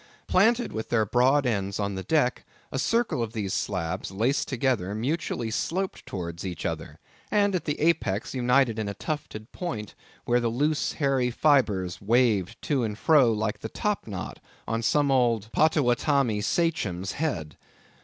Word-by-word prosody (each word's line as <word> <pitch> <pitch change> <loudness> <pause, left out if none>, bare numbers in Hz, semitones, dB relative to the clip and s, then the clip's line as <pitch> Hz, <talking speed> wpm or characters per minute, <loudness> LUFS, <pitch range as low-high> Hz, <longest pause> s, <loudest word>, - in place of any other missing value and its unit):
Planted 230 +6 +3
with 110 0 -4
their 110 -2 +2
broad 130 +6 +3
ends 100 -4 -1
on 100 -1 -1
the 95 - -4
deck, 135 +2 +1 0.3
a 135 - -2
circle 230 - +1
of 115 -1 -3
these 100 -4 -3
slabs 90 -2 -2
laced 115 +9 0
together, 115 -7 0
mutually 120 -2 -2
sloped 185 - -2
towards 85 -3 -5
each 90 -4 -5
other, - - -4 0.3
and 205 -1 +2
at 180 - -1
the 150 - -2
apex 150 -11 +1
united 125 -2 +2
in 105 -2 -2
a 100 - -5
tufted 110 -4 -5
point, 155 - -5 0.3
where 120 0 +3
the 120 -1 0
loose 145 +6 0
hairy 135 -4 +1
fibres 115 - +2
waved 110 -3 +2
to 140 -5 +1
and 105 -2 -3
fro 140 -4 +5
like 110 0 -1
the - - -6
top 210 - -2
knot 95 -4 -6 0.3
on 115 0 -1
some 140 +4 +2
old 115 -4 +2
Pottowottamie 140 -6 +2
Sachem's 105 - 0
head. 90 - -3
120 Hz, 160 wpm, -26 LUFS, 105-145 Hz, 0.3 s, fro